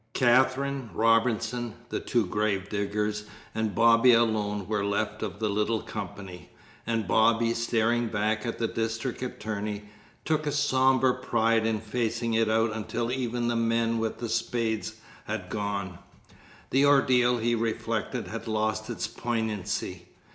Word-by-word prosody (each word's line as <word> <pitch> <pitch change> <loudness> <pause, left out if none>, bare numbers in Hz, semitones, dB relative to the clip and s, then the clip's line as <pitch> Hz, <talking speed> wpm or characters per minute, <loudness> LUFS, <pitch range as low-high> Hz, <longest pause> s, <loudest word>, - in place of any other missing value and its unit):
Katherine, 130 +1 +2
Robinson, 115 0 +1
the - - -2
two 120 -3 0
grave 100 0 -1
diggers, 105 +1 -2 0.3
and 110 -2 -2
Bobby 115 +2 +6
alone 105 -4 +1
were 105 -1 0
left 105 +1 -1
of 100 -5 -4
the 110 +1 -1
little 105 +2 0
company; 90 -4 -7 0.4
and 115 -4 -1
Bobby, 115 +3 +3
staring 115 0 +1
back 110 0 0
at 115 -2 -3
the 115 - 0
district 115 +3 -3
attorney, 105 -4 -4 0.4
took 155 -1 0
a - - +1
sombre 130 -3 +3
pride 115 -1 +1
in 110 -1 0
facing 115 +1 -2
it 110 -1 +2
out 110 +1 +2
until 115 +2 -3
even 120 -2 -1
the 120 - 0
men 115 0 +1
with 110 -1 -2
the 120 - -4
spades 115 -1 -1 0.3
had - - -5
gone. 100 -3 -3 0.7
The 135 +2 +4
ordeal, 130 -3 +4
he 120 +1 +1
reflected, 115 -1 -2
had - - -6
lost 110 0 -1
its - - -3
poignancy. 110 -3 -3
115 Hz, 140 wpm, -27 LUFS, 105-120 Hz, 0.7 s, Bobby